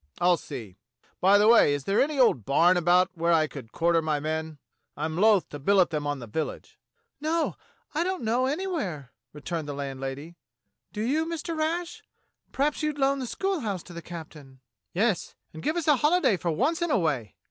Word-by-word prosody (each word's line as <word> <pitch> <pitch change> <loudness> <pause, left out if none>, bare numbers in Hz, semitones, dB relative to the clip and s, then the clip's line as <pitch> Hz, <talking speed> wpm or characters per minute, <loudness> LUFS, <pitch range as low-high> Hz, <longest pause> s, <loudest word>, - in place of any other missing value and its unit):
I'll 175 0 +4
see. 110 - -9 0.4
By 195 +2 +5
the 210 +1 +4
way, 220 -11 +6
is 145 - -5
there 195 +6 +2
any 295 +1 0
old 240 - +4
barn 170 - +4
about 180 +1 +3
where 170 -1 0
I 160 -2 +4
could 135 -7 -10
quarter 170 0 +2
my 155 -2 -1
men? 155 +1 -3 0.4
I'm 155 +2 -3
loath 205 +1 +4
to 145 - -7
billet 185 +3 +3
them 150 -2 -2
on 145 0 -1
the 125 - -8
village." 150 +8 -5 0.4
"No, 315 +2 0 0.4
I 315 +3 +1
don't 370 -5 -3
know 240 +4 +1
anywhere," 280 - -3 0.2
returned 155 +1 -5
the 145 - -4
land 140 -2 -5
lady. 140 +6 -6 0.5
"Do 210 - -5
you, 305 +7 0
Mr. 335 0 -4
Rash.^ 340 +6 -2 0.5
Perhaps 285 +2 0
you'd 305 -1 -1
loan 275 0 +2
the 255 - -4
schoolhouse 235 - -2
to 175 - -12
the 170 - -7
captain.^^" 155 -6 -10 0.3
"Yes, 205 +1 0 0.2
and 160 - -8
give 310 - -1
us 335 - -2
a 300 -3 +5
holiday 300 - +3
for 175 -1 -3
once 275 - 0
in 345 - 0
a 290 - +3
way!" 135 - -1
180 Hz, 195 wpm, -27 LUFS, -, 0.5 s, way